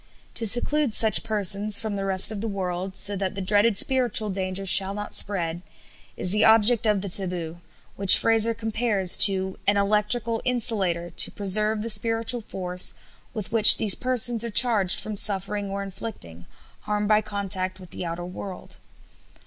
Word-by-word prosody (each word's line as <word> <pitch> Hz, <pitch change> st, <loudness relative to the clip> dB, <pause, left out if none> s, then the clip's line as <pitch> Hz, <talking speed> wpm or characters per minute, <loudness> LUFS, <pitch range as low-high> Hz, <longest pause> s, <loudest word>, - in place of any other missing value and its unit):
To 230 Hz, -, 0 dB
seclude 255 Hz, +3 st, +3 dB
such 220 Hz, -3 st, +3 dB
persons 210 Hz, -1 st, +1 dB
from 220 Hz, -2 st, -4 dB
the 195 Hz, -1 st, -6 dB
rest 190 Hz, +2 st, +3 dB
of 210 Hz, -2 st, -8 dB
the 225 Hz, -, -4 dB
world, 190 Hz, -2 st, -6 dB
so 200 Hz, +1 st, +1 dB
that 190 Hz, -1 st, -5 dB
the -, -, -7 dB
dreaded 205 Hz, +2 st, +1 dB
spiritual 240 Hz, -5 st, +1 dB
danger 190 Hz, 0 st, -5 dB
shall 195 Hz, +1 st, +4 dB
not 205 Hz, 0 st, -9 dB
spread, 175 Hz, -4 st, -1 dB, 0.6 s
is 180 Hz, -, -3 dB
the 210 Hz, -, +2 dB
object 225 Hz, +1 st, +2 dB
of 210 Hz, -2 st, -1 dB
the 200 Hz, -, -4 dB
taboo, 175 Hz, -3 st, -4 dB, 0.4 s
which 195 Hz, -1 st, +5 dB
Frazer 225 Hz, 0 st, 0 dB
compares 220 Hz, -4 st, 0 dB
to 190 Hz, -1 st, +4 dB
"an 205 Hz, 0 st, +1 dB
electrical 215 Hz, +3 st, -2 dB
insulator 195 Hz, -9 st, -2 dB
to -, -, +3 dB
preserve 210 Hz, +2 st, 0 dB
the 230 Hz, -, -6 dB
spiritual 225 Hz, +2 st, +1 dB
force 180 Hz, -3 st, -4 dB, 0.4 s
with 215 Hz, -4 st, -7 dB
which 220 Hz, -2 st, +8 dB
these 210 Hz, -3 st, +3 dB
persons 245 Hz, -2 st, 0 dB
are 235 Hz, -, -5 dB
charged 210 Hz, -5 st, +3 dB
from 215 Hz, -, -8 dB
suffering 200 Hz, 0 st, -3 dB
or 200 Hz, 0 st, -6 dB
inflicting, 190 Hz, -, -9 dB, 0.4 s
harm 210 Hz, 0 st, -3 dB
by 215 Hz, 0 st, +1 dB
contact 195 Hz, -3 st, -4 dB
with 180 Hz, -2 st, -16 dB
the -, -, -8 dB
outer 170 Hz, 0 st, -7 dB
world." 185 Hz, +1 st, -11 dB
205 Hz, 165 wpm, -22 LUFS, 190-220 Hz, 0.6 s, which